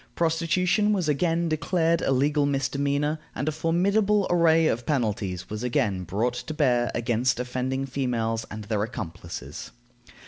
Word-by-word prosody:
Prostitution 180 +5 +2
was 185 -6 0
again 165 +3 +1
declared 165 +1 +1
a - - +1
legal 145 +2 +2
misdemeanor, 140 +2 0 0.2
and 140 - -3
a - - +2
formidable 195 +6 +2
array 165 -2 +4
of 120 -5 0
penalties 105 - -1
was 105 +1 -5
again 115 -7 0
brought 110 +8 0
to 155 +5 -6
bear 125 -5 +2
against 120 +1 +1
offending 130 +2 -2
females 120 -4 -1
and 110 0 -7
their 105 0 -1
accomplices. 85 - -6
135 Hz, 140 wpm, -26 LUFS, 115-165 Hz, 0.2 s, array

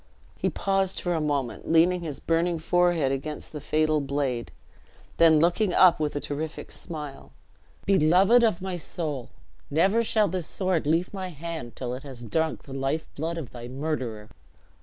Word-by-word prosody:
He - - 0
paused 195 -1 0
for 175 - -1
a 160 - 0
moment, 145 -2 -2
leaning 175 +2 +4
his 155 -5 -5
burning 165 +1 +1
forehead 170 -3 +2
against 150 +3 -4
the 150 - -6
fatal 155 0 +1
blade; 135 -4 -2 0.7
then 165 -2 +7
looking 175 +4 +2
up 185 -4 +6
with 150 -1 -1
a - - 0
terrific 150 +2 -5
smile. 150 -4 -7 0.5
"Beloved 195 +6 +5
of 215 -6 +2
my 190 -2 -3
soul! 150 -6 -4 0.4
never 195 +10 +3
shall 215 -2 +3
this 185 -4 -3
sword 185 -6 -1
leave 165 +5 +1
my 190 -2 -4
hand 160 -7 -6
till 125 -1 -4
it 130 - -6
has 130 -4 -10
drunk 160 +7 -1
the 135 - -10
life 135 +4 -1
blood 165 +3 -3
of 150 -8 -6
thy 120 -1 -8
murderer." 125 -6 -4
160 Hz, 165 wpm, -26 LUFS, 140-175 Hz, 0.7 s, then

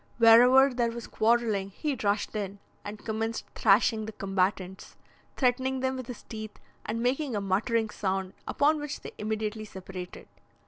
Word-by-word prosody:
Wherever 250 +4 +7
there 240 -1 +1
was 235 0 -6
quarrelling, 220 -4 +1
he 290 +8 -3
rushed 205 +1 0
in, 200 -1 -3 0.3
and 210 +1 -8
commenced 225 +1 -2
thrashing 220 +1 +3
the - - -5
combatants, 190 -1 -2 0.4
threatening 260 0 +1
them 260 0 0
with 255 -2 -6
his 245 - -8
teeth, 215 -1 -8 0.3
and 230 +2 -2
making 260 0 0
a - - 0
muttering 215 +3 0
sound, 190 -2 -2
upon 300 +2 +2
which 295 -1 -5
they - - -8
immediately 215 0 -3
separated. 190 -3 -9
220 Hz, 150 wpm, -28 LUFS, 200-245 Hz, 0.4 s, Wherever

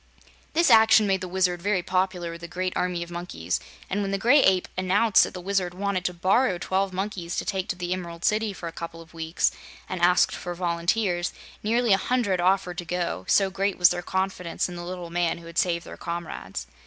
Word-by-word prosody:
This 335 +2 +4
action 220 -1 +7
made 190 -2 +1
the 185 - -4
Wizard 180 -1 0
very 190 -1 0
popular 185 -2 -1
with 170 0 -9
the 170 - -6
great 185 +1 -3
army 180 -1 -1
of 170 - -11
monkeys, 170 - -3 0.3
and 200 +2 -1
when 200 - -2
the 195 - 0
Gray 245 +9 +5
Ape 190 -5 +3
announced 195 +3 +4
that - - -4
the - - -5
Wizard 185 -1 -1
wanted 195 -1 -2
to 180 - 0
borrow 190 +4 +2
twelve 190 +2 -1
monkeys 185 -2 -4
to - - -2
take 190 -1 -2
to - - -1
the 180 0 -2
Emerald 170 -2 -6
City 215 0 +2
for 180 -3 -7
a - - -5
couple 165 0 -7
of 165 0 -14
weeks, 165 0 0 0.4
and 185 -2 -4
asked 180 +1 +4
for 175 -1 -5
volunteers, 175 +1 0 0.3
nearly 230 0 +2
a - - +5
hundred 205 -6 0
offered 180 -1 +1
to 175 - -5
go, 170 - -2
so 195 -1 +3
great 195 +1 -1
was 180 -1 +7
their 175 - -2
confidence 190 -2 -2
in 180 - -8
the 175 - -6
little 175 -1 -6
man 175 -1 0
who 170 - -12
had 170 +1 -2
saved 170 -2 0
their - - -9
comrades. 170 -1 -5
180 Hz, 220 wpm, -25 LUFS, 175-195 Hz, 0.4 s, action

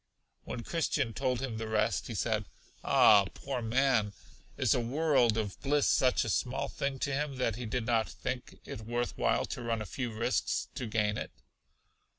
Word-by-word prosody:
When 120 - -5
Christian 150 -7 -1
told 125 0 -1
him 125 -5 -3
the 110 0 -4
rest, 110 -2 0
he 115 - -5
said: 110 0 0 0.4
Ah, 100 -2 +6
poor 135 -3 -4
man! 115 -2 +2 0.4
Is - - +3
a - - +1
world 125 -2 +2
of 105 -3 -3
bliss 145 0 +2
such 130 -2 +3
a - - -2
small 125 +4 0
thing 140 -1 -2
to 140 +1 -2
him, 145 0 -1
that 125 -4 0
he 120 0 -5
did 120 +1 -2
not 115 -2 +1
think 125 -1 -5
it 105 - -7
worth 120 +2 -2
while - - +1
to - - -6
run 115 -1 -1
a 110 - -4
few 125 +2 -4
risks 115 +4 -1
to 125 - -4
gain 105 -1 0
it? - - -5
120 Hz, 185 wpm, -31 LUFS, 110-130 Hz, 0.4 s, Ah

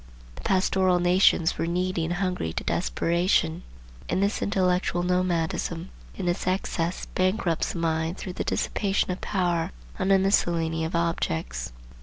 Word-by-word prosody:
The - - -11
pastoral 185 -1 +2
nations 175 -1 +3
were 165 - 0
needy 180 0 0
and 175 +2 -1
hungry 180 - -2
to - - -3
desperation; 170 - +1 0.5
and 190 - +1
this 200 - 0
intellectual 180 -2 +1
nomadism, 175 -1 -1 0.2
in 185 - -3
its 175 +1 -1
excess, 180 -2 -1
bankrupts 185 -3 0
the - - -5
mind 165 +1 -1
through 185 - -6
the - - -3
dissipation 195 -2 0
of 180 - -5
power 175 -4 0 0.3
on 190 - 0
a 195 - +6
miscellany 170 -4 +1
of 160 - -3
objects. 80 - -1
175 Hz, 145 wpm, -26 LUFS, 165-185 Hz, 0.5 s, a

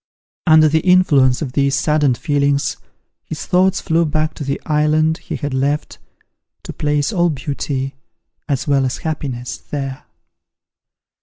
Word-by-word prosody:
Under 155 -1 +7
the 160 +1 +2
influence 155 -7 +3
of 135 - -5
these 140 0 +2
saddened 150 -4 +2
feelings, 145 0 0 0.5
his 160 - -6
thoughts 185 +1 +2
flew 165 0 +1
back 155 0 -1
to - - -7
the 140 0 -2
island 155 +1 +2
he - - -6
had 145 -2 -4
left, 140 +3 -1 0.6
to - - -7
place 150 +5 0
all 175 -2 +2
beauty, 135 -2 -3 0.6
as 140 -1 -1
well 140 -1 +3
as 130 -1 -1
all - - -15
happiness, 135 -6 -4
there! 135 -1 -6
145 Hz, 145 wpm, -18 LUFS, 140-155 Hz, 0.6 s, Under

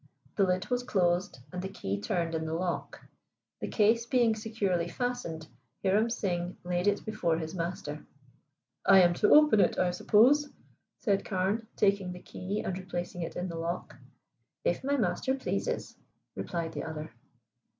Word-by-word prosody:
the 200 - +3
lid 185 -1 +1
was 245 0 +2
closed, 180 - +1 0.2
and 180 - -3
the 190 - -4
key 100 - -4
turned 165 - -1
in 160 0 -1
the 160 - -2
lock. 175 0 -3 0.5
The - - -3
case 230 +2 +3
being 240 -3 +3
securely 215 -6 -1
fastened, 170 -6 -3 0.4
Hiram 205 +4 +3
Singh 180 -6 -2
laid 180 +1 -1
it 205 - +1
before 215 -7 0
his 160 0 -5
master. 165 -4 -4 0.8
"I 195 -1 +7
am 175 0 +4
to 210 - +2
open 300 -8 +7
it, - - +3
I 180 -1 +2
suppose?" 265 +11 +4 0.5
said 200 -3 +1
Carne, 200 +4 -1
taking 195 -3 +2
the 180 - -9
key 195 +3 -4
and 185 - -3
replacing 175 -1 -5
it 165 - -4
in 180 +1 -2
the 165 -2 -5
lock. 170 +2 -4 0.7
"If - - 0
my 285 +1 +1
master 260 +4 0
pleases," 270 - -3 0.4
replied 170 -2 -3
the - - -5
other. 155 0 -6
185 Hz, 160 wpm, -30 LUFS, 175-215 Hz, 0.8 s, I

